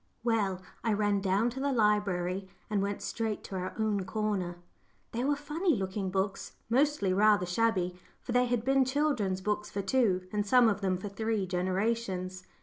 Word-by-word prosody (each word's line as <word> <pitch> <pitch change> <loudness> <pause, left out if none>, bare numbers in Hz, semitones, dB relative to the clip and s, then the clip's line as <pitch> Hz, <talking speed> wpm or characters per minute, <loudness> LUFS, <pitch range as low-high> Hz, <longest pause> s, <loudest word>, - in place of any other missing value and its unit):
Well, 200 -6 0 0.2
I 225 - +2
ran 205 -1 +1
down 200 +5 +2
to 260 - -6
the 280 +1 0
library 195 -5 +1 0.2
and 205 -2 +2
went 200 0 -2
straight 220 -2 -2
to 195 - -7
our 185 0 -4
own 215 -3 0
corner. 190 -3 -2 0.5
They 235 +2 -2
were 290 +2 +2
funny 305 +4 0
looking 190 0 -2
books 195 +1 -2 0.2
mostly 260 -7 +2
rather 205 -1 +4
shabby, 180 -2 0 0.2
for - - -6
they 250 +1 +3
had 240 -1 -1
been 270 0 +4
children's 260 -9 0
books 210 +1 -1
for 200 - -3
two, 190 -5 +2
and 210 0 +1
some 240 +3 +5
of 205 -1 -1
them 185 -2 +1
for 185 - -6
three, 220 0 -1
generations. 185 0 -2
205 Hz, 175 wpm, -30 LUFS, 190-230 Hz, 0.5 s, some